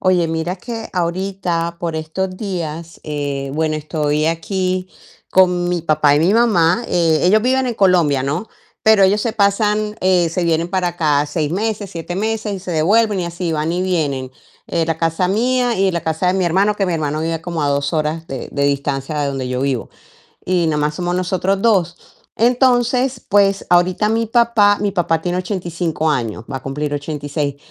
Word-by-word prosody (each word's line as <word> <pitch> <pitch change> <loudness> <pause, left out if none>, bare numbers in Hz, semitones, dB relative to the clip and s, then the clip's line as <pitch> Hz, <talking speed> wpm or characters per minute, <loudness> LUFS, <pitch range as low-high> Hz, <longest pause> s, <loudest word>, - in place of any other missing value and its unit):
Oye, 180 -3 +2
mira 165 +2 -2
que 225 +4 -7
ahorita, 175 -1 -2
por 165 -2 -2
estos 185 +4 -3
días, 170 -5 -5
eh, 145 -2 -3
bueno, 155 0 0
estoy 150 0 -1
aquí 185 +2 -1 0.4
con 180 -1 +3
mi 175 -2 -1
papá 150 -3 +3
y 145 - +2
mi 175 +5 +3
mamá. 215 -3 +3
Eh, 165 -3 +2
ellos 210 +4 +4
viven 260 +1 +2
en 240 - -2
Colombia, 175 - +3
¿no? 150 +11 -2 0.4
Pero 220 -2 +6
ellos 195 +2 +4
se 230 +1 -1
pasan, 210 +1 +1
eh, 180 -2 +3
se 170 +2 -2
vienen 165 0 +1
para 185 -2 0
acá 150 -4 +1
6 150 0 -2
meses, 205 +1 -2
7 170 +1 -6
meses 215 +1 -2
y 190 - -6
se 185 - -7
devuelven 200 +6 +2
y 180 - -1
así, 170 0 -3
van 155 +1 -1
y 180 +1 -1
vienen, 145 -8 -1 0.4
eh, 165 -1 0
la 165 -1 -1
casa 165 +2 0
mía 245 +4 +1
y 190 0 +2
la 170 - -2
casa 160 +3 -1
de 180 - +2
mi 190 -1 +1
hermano, 195 +5 +2
que 195 - 0
mi 180 - -1
hermano 155 -2 -2
vive 165 0 -2
como 170 -1 -4
a 145 - +1
2 140 +2 0
horas 155 +1 -1
de 135 -2 -6
de 140 - -1
distancia 140 +1 -1
de 145 - 0
donde 135 -2 -3
yo 125 +1 -2
vivo, 135 -4 -2 0.5
y 180 -2 +1
nomás 150 -1 0
somos 175 +1 -2
nosotros 185 +2 0
2. 185 -6 +2 0.4
Entonces, 250 +1 +2
pues, 200 -1 +3
ahorita 175 +4 +3
mi 225 +1 +1
papá 225 -3 +3
mi 205 -1 0
papá 170 -4 0
tiene 175 +1 -2
85 175 -4 -2
años, 115 -6 -2
va 135 - -2
a 130 - -15
cumplir 145 +2 -3
86, 145 0 -3
175 Hz, 190 wpm, -18 LUFS, 155-195 Hz, 0.5 s, Pero